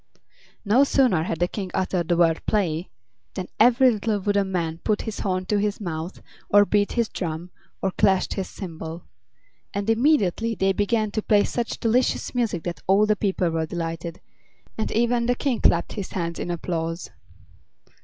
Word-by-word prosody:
No 230 +7 +5
sooner 255 - +3
had 165 -1 -3
the 175 - +2
King 190 0 -5
uttered 185 -2 0
the 175 -1 +2
word 165 -2 +3
"play" 180 -5 0 0.5
than 185 -1 -4
every 250 +3 +6
little 215 -1 -1
wooden 200 0 0
man 165 -3 -2
put 210 +3 0
his 220 -2 -5
horn 185 -2 -1
to 205 +2 +1
his 205 0 -1
mouth, 170 -2 -5 0.3
or 205 0 +6
beat 205 0 +1
his 235 -2 +1
drum, 170 -2 -5 0.3
or 195 - +1
clashed 190 0 +2
his 190 -2 -4
cymbal; 165 -2 -7 0.7
and 200 +2 0
immediately 225 - +2
they 195 -1 +2
began 215 +2 0
to 215 - -1
play 205 -1 +4
such 240 -2 -3
delicious 240 +2 +1
music 230 -9 -1
that 175 -1 -5
all 195 +3 +5
the 215 0 +2
people 190 -4 0
were 160 -1 -1
delighted, 165 0 -4 0.6
and 220 - -2
even 235 +1 +1
the 245 - +2
King 250 -2 -1
clapped 170 0 +3
his 200 -3 -6
hands 170 -2 -3
in - - -4
applause. 170 0 -3
195 Hz, 175 wpm, -24 LUFS, 170-220 Hz, 0.7 s, every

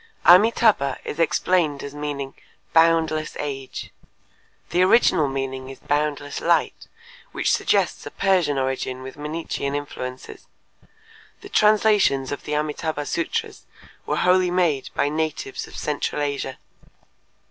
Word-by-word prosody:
Amitâbha 185 - +5
is 150 - -6
explained 160 -1 +1
as 140 - -7
meaning 145 -2 -4 0.4
"boundless 160 -1 +3
age." 135 -3 -5 0.8
The 175 - +2
original 185 -6 +4
meaning 135 -1 -4
is 135 - -9
"boundless 145 -1 -2
light," - - +1 0.5
which - - 0
suggests - - +1
a - - -4
Persian 180 -8 +1
origin 130 -1 -2
with 130 - -8
Mannichean 150 -2 -4
influences. 130 -3 -7 0.9
The 400 - -11
translations 210 - +3
of 145 - -5
the 150 - -3
Amitâbha 150 0 -2
sutras 170 - -3 0.4
were - - 0
wholly 180 0 +3
made 175 -6 +1
by - - +2
natives 160 - -3
of - - -11
central - - -2
Asia. 140 -2 -3
150 Hz, 120 wpm, -23 LUFS, 140-175 Hz, 0.9 s, Amitâbha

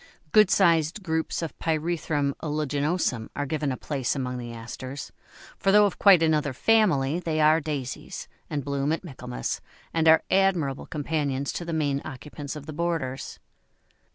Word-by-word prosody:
Good 215 -3 +6
sized 170 0 +3
groups 160 -1 -1
of 165 - -5
Pyrethrum 155 -3 0
uliginosum 150 -4 -1
are 145 - -1
given 150 0 -1
a 130 - -3
place 140 -3 -2
among 125 -2 -3
the 120 -1 -6
Asters, 130 +4 -7 0.5
for 195 - +3
though 210 +1 +7
of 200 - -2
quite 190 -5 +7
another 150 -3 +2
family, 170 - +3
they 160 -3 -2
are 155 +1 +5
Daisies, 140 -4 -5 0.2
and 145 -3 -3
bloom 140 +1 0
at 165 - -1
Michaelmas, 125 - -5 0.3
and 165 -1 +2
are 160 0 +7
admirable 180 -8 +2
companions 145 -2 -2
to 175 - -4
the 170 - -4
main 145 -3 0
occupants 145 0 -7
of 150 -2 -8
the 155 - -7
borders. 160 -5 -3
150 Hz, 155 wpm, -26 LUFS, 140-165 Hz, 0.5 s, though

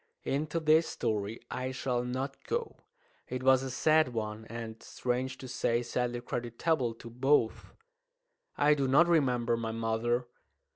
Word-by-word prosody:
Into 155 +4 -1
this 160 +1 +4
story 105 0 -2
I 130 0 -2
shall 125 -1 -1
not 130 +2 -4
go. 470 0 -2 0.5
It 125 0 -4
was 130 0 +5
a 135 - -4
sad 155 -1 +3
one, 110 0 -3
and, 115 -1 -7
strange 130 +1 -2
to 130 - -8
say, 120 -1 0
sadly 120 0 -2
creditable 120 +2 -1
to 115 - -10
both. 125 -1 +1 0.8
I 145 +1 +5
do 140 -2 0
not 145 +6 +5
remember 125 -8 +2
my 115 -1 -3
mother. 115 +2 0
125 Hz, 145 wpm, -31 LUFS, 115-135 Hz, 0.8 s, was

